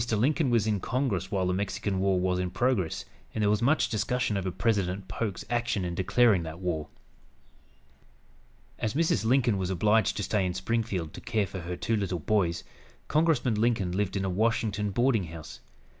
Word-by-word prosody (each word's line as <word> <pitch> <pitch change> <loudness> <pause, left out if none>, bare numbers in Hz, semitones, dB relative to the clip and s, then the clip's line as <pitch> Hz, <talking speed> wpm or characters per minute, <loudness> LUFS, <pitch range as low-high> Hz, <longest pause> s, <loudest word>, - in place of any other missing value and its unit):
Lincoln 135 +7 +2
was 115 -3 +3
in 105 -2 +1
Congress 105 -5 -1
while 95 -3 0
the 90 - +1
Mexican 100 0 -2
War 95 -1 +2
was 90 0 0
in 90 0 -1
progress, 110 -6 0 0.3
and 110 - 0
there 105 - +3
was 105 +1 +1
much 140 +7 +3
discussion 115 0 0
over 95 -1 -1
President 95 -2 -1
Polk's 100 0 -4
action 120 -5 -1
in 85 - -3
declaring 100 +2 +3
that 80 0 -6
war. 85 -5 -2 1.9
As 110 +1 -2
Mrs. 155 - +1
Lincoln 120 -4 +3
was 95 -1 -1
obliged 105 +4 +2
to 105 - -1
stay 105 0 +1
in 90 -1 -1
Springfield 95 -5 -2
to - - -9
care 105 -2 0
for 95 - -7
her 90 +1 -5
two 115 +4 0
little 100 -4 -1
boys, 85 0 0 0.5
Congressman 150 -6 +2
Lincoln 110 -6 +1
lived 100 +1 -1
in 95 - -1
a - - 0
Washington 105 0 0
boarding 115 -1 +2
house. 80 -2 -9
105 Hz, 180 wpm, -28 LUFS, 95-115 Hz, 1.9 s, was